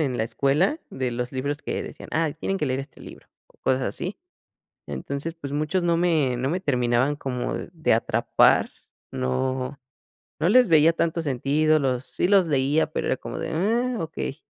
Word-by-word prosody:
en 135 Hz, -5 st, 0 dB
la 110 Hz, -, 0 dB
escuela 150 Hz, -, +1 dB
de 130 Hz, -2 st, -2 dB
los 125 Hz, +1 st, -3 dB
libros 140 Hz, +3 st, -2 dB
que -, -, -3 dB
decían: -, -, -9 dB
"Ay 160 Hz, -2 st, 0 dB
tienen 195 Hz, +5 st, -2 dB
que 150 Hz, -, 0 dB
leer 130 Hz, +1 st, -1 dB
este 135 Hz, -, -12 dB
libro," -, -, -12 dB, 0.2 s
o -, -, -28 dB
cosas 130 Hz, 0 st, +1 dB
así. 180 Hz, +8 st, -4 dB, 0.7 s
Entonces, 140 Hz, +4 st, -4 dB
pues 145 Hz, -4 st, -8 dB
muchos 155 Hz, +5 st, 0 dB
no 170 Hz, -1 st, +2 dB
me 155 Hz, -8 st, +2 dB
no 130 Hz, +3 st, -1 dB
me 180 Hz, +3 st, -1 dB
terminaban 125 Hz, -1 st, +1 dB
como 125 Hz, -3 st, -3 dB
de 165 Hz, -6 st, -1 dB
atrapar, 115 Hz, -, +3 dB, 0.4 s
no 130 Hz, -, -2 dB, 0.6 s
no 160 Hz, -, +2 dB
les 250 Hz, 0 st, +6 dB
veía 160 Hz, 0 st, +5 dB
tanto 165 Hz, 0 st, 0 dB
sentido, 150 Hz, +3 st, +2 dB
los 130 Hz, -2 st, -1 dB
sí -, -, -1 dB
los 195 Hz, -4 st, +4 dB
leía, 145 Hz, +2 st, +1 dB
pero -, -, -2 dB
era 130 Hz, -, +1 dB
como -, -, -7 dB
de: 160 Hz, 0 st, -3 dB
"Ah, 230 Hz, +8 st, 0 dB
okey". 160 Hz, -2 st, -5 dB
150 Hz, 180 wpm, -25 LUFS, 130-165 Hz, 0.7 s, les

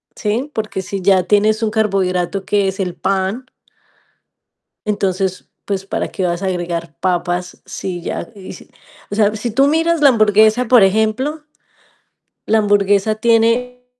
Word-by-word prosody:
¿Sí? 230 Hz, +6 st, -2 dB
Porque 215 Hz, -3 st, -3 dB
si 195 Hz, +1 st, -5 dB
ya 190 Hz, 0 st, +3 dB
tienes 215 Hz, +4 st, +2 dB
un 215 Hz, -, 0 dB
carbohidrato 195 Hz, -3 st, 0 dB
que 200 Hz, 0 st, +1 dB
es 190 Hz, +1 st, -4 dB
el 180 Hz, -3 st, -2 dB
pan 195 Hz, +6 st, -2 dB, 1.4 s
entonces, 195 Hz, -2 st, -2 dB, 0.2 s
pues 195 Hz, -1 st, -3 dB
para -, -, -3 dB
qué 185 Hz, -, -3 dB
vas 175 Hz, 0 st, -2 dB
a -, -, 0 dB
agregar 170 Hz, -3 st, -4 dB
papas, 180 Hz, 0 st, -2 dB
si 180 Hz, -2 st, -5 dB
ya -, -, -5 dB
Y 190 Hz, -2 st, -10 dB
si, -, -, -14 dB, 0.4 s
o -, -, -2 dB
sea, 210 Hz, 0 st, +2 dB
si 225 Hz, +2 st, -4 dB
tú 270 Hz, +5 st, +3 dB
miras 325 Hz, +1 st, +1 dB
la 285 Hz, -, +7 dB
hamburguesa, 215 Hz, +1 st, +3 dB
por 245 Hz, -1 st, +6 dB
ejemplo 220 Hz, +10 st, 0 dB, 1.0 s
la 220 Hz, -, +3 dB
hamburguesa 205 Hz, 0 st, +2 dB
tiene 235 Hz, +2 st, +1 dB
205 Hz, 150 wpm, -17 LUFS, 190-225 Hz, 1.4 s, la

